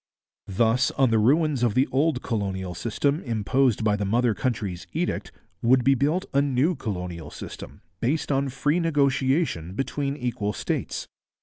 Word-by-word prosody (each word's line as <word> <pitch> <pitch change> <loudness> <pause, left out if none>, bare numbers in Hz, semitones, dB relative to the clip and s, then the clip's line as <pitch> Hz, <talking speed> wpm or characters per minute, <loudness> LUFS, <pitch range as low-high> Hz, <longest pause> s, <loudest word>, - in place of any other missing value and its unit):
Thus, 115 +6 +2
on 130 -3 +4
the 110 - +4
ruins 145 +4 +3
of 120 -4 +1
the 130 - +4
old 140 0 +1
colonial 95 -5 -2
system 140 - -1
imposed 120 - +1
by 105 -1 +3
the 105 - -2
mother 115 +3 +2
country's 100 - -3
edict, - - -2 0.3
would 125 +2 +4
be 135 - +5
built 150 +7 +1
a 140 - +4
new 140 +4 +2
colonial 90 - -5
system - - -9 0.2
based 145 +5 0
on 135 0 +1
free 145 +5 0
negotiation 140 - +1
between 140 +3 -2
equal 115 -5 -2
states. 105 - -3
125 Hz, 150 wpm, -25 LUFS, 105-140 Hz, 0.3 s, be